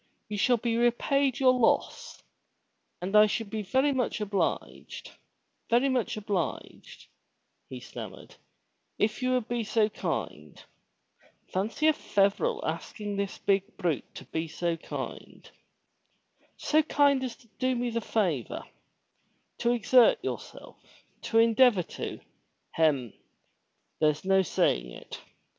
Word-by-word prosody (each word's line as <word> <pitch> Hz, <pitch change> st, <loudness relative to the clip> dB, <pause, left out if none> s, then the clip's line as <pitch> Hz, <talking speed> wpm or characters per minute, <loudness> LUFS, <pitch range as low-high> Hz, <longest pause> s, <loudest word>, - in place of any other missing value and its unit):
You 210 Hz, -, -3 dB
shall 245 Hz, +4 st, +4 dB
be 230 Hz, 0 st, -1 dB
repaid 260 Hz, +3 st, +2 dB
for -, -, -3 dB
your 255 Hz, -1 st, +7 dB
loss, 230 Hz, -, 0 dB, 0.8 s
and 195 Hz, +3 st, -2 dB
I 210 Hz, 0 st, +8 dB
should 215 Hz, -1 st, -3 dB
be 220 Hz, -, -2 dB
very 265 Hz, +8 st, +2 dB
much 250 Hz, -3 st, -1 dB
obliged, 205 Hz, -2 st, -3 dB, 0.6 s
very 245 Hz, +4 st, +3 dB
much 250 Hz, -4 st, -1 dB
obliged, 205 Hz, -3 st, -4 dB, 0.6 s
he -, -, -7 dB
stammered, -, -, -10 dB, 0.6 s
if 215 Hz, +3 st, 0 dB
you 255 Hz, 0 st, +1 dB
would 250 Hz, -3 st, 0 dB
be 240 Hz, -1 st, -1 dB
so 215 Hz, 0 st, +2 dB
kind -, -, -5 dB, 0.9 s
(fancy 210 Hz, +11 st, -1 dB
a 315 Hz, -, +6 dB
Feverel 295 Hz, -, +1 dB
asking 205 Hz, -2 st, -4 dB
this 200 Hz, -1 st, -3 dB
big 195 Hz, +1 st, 0 dB
brute 175 Hz, -7 st, -2 dB
to -, -, -9 dB
be 160 Hz, +1 st, -3 dB
so 170 Hz, +2 st, -2 dB
kind), 165 Hz, -, -8 dB, 1.1 s
so 310 Hz, +1 st, +3 dB
kind 285 Hz, -3 st, +2 dB
as 250 Hz, -3 st, -4 dB
to 230 Hz, -, -23 dB
do 255 Hz, 0 st, +1 dB
me 240 Hz, 0 st, -1 dB
the 230 Hz, 0 st, -1 dB
favor, 175 Hz, -, -1 dB, 0.5 s
— -, -, -44 dB
to 235 Hz, -, +2 dB
exert 245 Hz, +1 st, +5 dB
yourself -, -, -7 dB, 0.3 s
— -, -, -40 dB
to 225 Hz, -, +2 dB
endeavor 230 Hz, -3 st, +5 dB
to -, -, -6 dB, 0.3 s
— -, -, -48 dB
hem! 140 Hz, -8 st, +1 dB, 0.9 s
(there's 155 Hz, +1 st, +1 dB
no 190 Hz, 0 st, +4 dB
saying 60 Hz, -, +1 dB
it!) -, -, -10 dB
225 Hz, 135 wpm, -28 LUFS, 195-255 Hz, 1.1 s, I